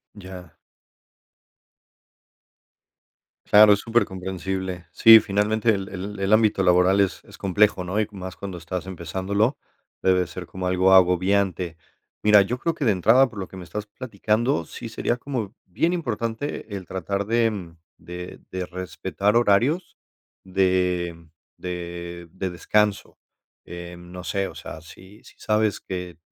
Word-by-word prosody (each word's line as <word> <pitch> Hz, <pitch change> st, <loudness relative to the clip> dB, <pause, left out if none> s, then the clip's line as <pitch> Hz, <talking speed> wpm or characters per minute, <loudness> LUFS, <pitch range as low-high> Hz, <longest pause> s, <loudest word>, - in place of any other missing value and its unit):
Ya. 90 Hz, -4 st, -11 dB, 2.9 s
Claro, 105 Hz, 0 st, +7 dB
es 100 Hz, -, 0 dB
súper 115 Hz, -2 st, +1 dB
comprensible. 95 Hz, -1 st, -5 dB
Sí, 115 Hz, 0 st, +9 dB
finalmente, 105 Hz, +2 st, 0 dB
el 95 Hz, +1 st, -5 dB
el 100 Hz, +2 st, -6 dB
el 100 Hz, +2 st, +1 dB
ámbito 110 Hz, -3 st, +3 dB
laboral, 90 Hz, +2 st, +4 dB
es 95 Hz, -, -1 dB
es -, -, -14 dB
complejo, 100 Hz, -1 st, +2 dB
¿no? 95 Hz, +4 st, -2 dB
Y 105 Hz, -, +1 dB
más, 95 Hz, -2 st, -8 dB
cuando 95 Hz, -3 st, -6 dB
estás 90 Hz, +2 st, -5 dB
empezándolo, 95 Hz, -, -1 dB, 0.4 s
debe 90 Hz, -1 st, +3 dB
ser 90 Hz, 0 st, -8 dB
como 95 Hz, +1 st, -6 dB
algo 95 Hz, +1 st, +3 dB
agobiante. 90 Hz, -1 st, +3 dB, 0.5 s
Mira, 105 Hz, -1 st, +7 dB
yo 120 Hz, +6 st, -1 dB
creo 165 Hz, +5 st, -1 dB
que, 150 Hz, -5 st, -3 dB
de 110 Hz, -, +4 dB
entrada, 115 Hz, +8 st, +4 dB
por 110 Hz, -4 st, -13 dB
lo 95 Hz, -, -4 dB
que 95 Hz, -, -11 dB
me 90 Hz, -, -8 dB
estás 105 Hz, +3 st, -5 dB
platicando, 110 Hz, -1 st, -1 dB
sí 115 Hz, -, -8 dB
sería 115 Hz, +2 st, -2 dB
como 125 Hz, -6 st, -4 dB
bien 165 Hz, -, 0 dB
importante, 115 Hz, -, -3 dB
el 95 Hz, -2 st, -6 dB
tratar 100 Hz, +2 st, -3 dB
de, 115 Hz, 0 st, +2 dB
mm, 85 Hz, -5 st, -8 dB, 0.2 s
de 90 Hz, +1 st, -9 dB
de 95 Hz, -1 st, -4 dB
respetar 95 Hz, +4 st, -2 dB
horarios, 120 Hz, -, +2 dB, 0.5 s
de 90 Hz, -3 st, 0 dB, 0.3 s
de 85 Hz, -1 st, -6 dB
de 95 Hz, 0 st, -4 dB
descanso. 105 Hz, +4 st, 0 dB, 0.5 s
Em, 85 Hz, 0 st, -10 dB
no 90 Hz, -1 st, -8 dB
sé, 100 Hz, -1 st, -1 dB
o -, -, -11 dB
sea, 80 Hz, -, -8 dB
si 95 Hz, +5 st, -15 dB
si -, -, -16 dB
sabes 105 Hz, -1 st, 0 dB
que 90 Hz, -3 st, -6 dB
95 Hz, 145 wpm, -24 LUFS, 90-105 Hz, 2.9 s, Sí